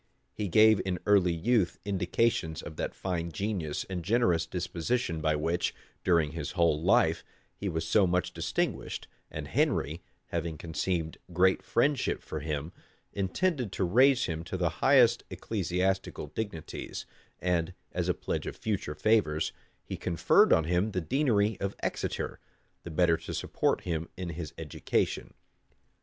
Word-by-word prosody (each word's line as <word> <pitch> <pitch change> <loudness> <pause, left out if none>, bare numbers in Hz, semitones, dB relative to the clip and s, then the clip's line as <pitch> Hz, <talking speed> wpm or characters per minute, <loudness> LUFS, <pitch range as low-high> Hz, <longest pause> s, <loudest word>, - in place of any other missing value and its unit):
He 105 - -3
gave 110 +4 +6
in 95 -2 -1
early 100 -4 +5
youth 90 +1 +1
indications 90 -3 0
of 75 - -8
that - - -3
fine 85 -3 -3
genius 90 -4 -2
and 90 -3 -4
generous 90 -5 +2
disposition 90 +1 -2
by 75 0 +2
which, 80 +3 0 0.3
during 85 -5 +3
his 80 +1 -5
whole 85 -4 +2
life, - - +3 0.3
he 100 - -3
was 80 -1 -2
so 100 0 +4
much 90 0 0
distinguished - - -2 0.2
and 75 -2 -6
Henry, 80 +4 +1 0.3
having 85 -2 -2
conceived 80 0 -2
great 95 +2 +3
friendship 140 +3 +1
for 80 - -5
him, 75 +1 -3 0.4
intended 120 - 0
to - - -1
raise 130 +8 +5
him 80 -1 -3
to 95 - -4
the 90 -2 +1
highest 130 -4 +5
ecclesiastical 95 -3 -1
dignities; 100 -7 -5 0.3
and, 90 -1 0 0.2
as - - -1
a - - +2
pledge - - -3
of - - -4
future 100 -8 -2
favors, 90 -9 +2 0.3
he - - -6
conferred 85 -2 +4
on 80 - +5
him 90 +6 0
the 90 - 0
deanery 110 - +1
of 100 0 -2
Exeter,[*] - - -2 0.4
the - - -8
better 85 0 +3
to - - -6
support - - 0
him 85 -2 -3
in 90 -1 -4
his 85 -1 -5
education. - - -2
90 Hz, 150 wpm, -29 LUFS, 80-100 Hz, 0.4 s, gave